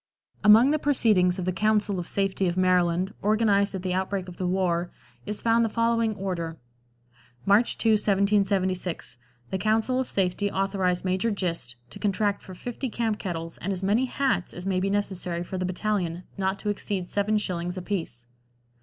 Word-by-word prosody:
Among 225 +6 +7
the 305 - +1
proceedings 215 -11 +3
of 185 - -3
the 185 - 0
"Council 210 -1 +1
of 175 - -5
Safety" 195 -1 0
of 175 +1 -1
Maryland, 180 +1 +2
organized 205 -1 +2
at 185 - -5
the 185 -1 -1
outbreak 190 0 -2
of 180 - -10
the 185 - -2
war, 180 -2 0 0.4
is 210 0 -3
found 230 0 +4
the 225 - +1
following 230 -1 +1
order: 175 -4 -4 0.9
"March 205 +4 +3
2, 225 - +2
1776. 195 - +1 0.3
The 190 - -1
Council 220 +5 +1
of 260 - -2
Safety 195 +1 0
authorize 190 -2 0
Major 185 +4 +1
Gist 170 - -2 0.2
to - - -9
contract 205 0 0
for 185 - -11
fifty 245 +6 -5
camp 225 -2 -1
kettles 165 -3 -5
and 195 - -3
as 190 0 -3
many 215 +7 +2
hats 245 -8 -1
as 180 - -7
may 190 -1 +1
be 195 +1 0
necessary 185 -4 -1
for 185 +1 -5
the 185 - -1
battalion, 185 -2 -2
not 190 0 -1
to 210 - -3
exceed 195 -3 -3
7 205 +1 +1
shillings 180 -3 -3
apiece." 170 - -4
195 Hz, 175 wpm, -26 LUFS, 180-210 Hz, 0.9 s, Among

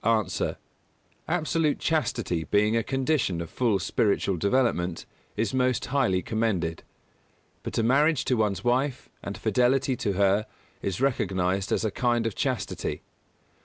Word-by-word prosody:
_ 110 -1 +1
A. - - -1 0.7
Absolute 160 -2 +1
chastity 115 - -1
being 105 +2 +2
a 115 - +3
condition 135 - 0
of 85 -1 -6
full 115 -5 +1
spiritual 100 +1 +1
development, 95 -4 0 0.3
is 110 +1 0
most 130 -1 +1
highly 120 -10 +1
commended; 100 -8 -1 0.8
but - - -5
a 115 - +2
marriage 140 +5 +3
to - - +1
one 105 -4 +1
wife 125 +2 0
and - - -6
fidelity 130 +1 +2
to 100 - -1
her 100 +2 +2 0.3
is 95 +3 -3
recognised 95 -7 0
as - - +1
a 110 - 0
kind 120 0 +1
of 115 - -1
chastity. - - -3
115 Hz, 140 wpm, -26 LUFS, 100-130 Hz, 0.8 s, a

